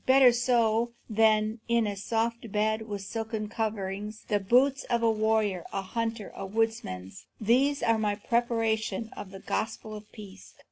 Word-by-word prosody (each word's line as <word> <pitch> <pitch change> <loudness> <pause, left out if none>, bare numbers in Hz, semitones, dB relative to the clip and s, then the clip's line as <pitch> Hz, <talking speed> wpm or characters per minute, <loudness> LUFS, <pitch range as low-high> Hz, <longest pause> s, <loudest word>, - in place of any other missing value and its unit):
Better 260 -1 +7
so 235 -1 +2 0.2
than 215 0 +3
in 235 -1 +3
a 205 -1 -2
soft 230 +2 -2
bed 215 +1 +1
with 205 -2 -4
silken 220 +1 -3
coverings. 210 -1 -3
The 205 - +2
boots 255 +7 +3
of 235 -1 0
a 225 - +5
warrior, 215 -4 +1
a 195 - -2
hunter, 225 +1 -3
a - - -7
woodsman, 195 - -2 0.3
these 265 +6 +2
are 230 -1 +3
my 210 -1 +1
preparation 225 -1 0
of 195 - -7
the 195 - -9
gospel 220 +1 -3
of 210 0 -10
peace." 200 -3 -12
220 Hz, 155 wpm, -28 LUFS, 210-230 Hz, 0.3 s, Better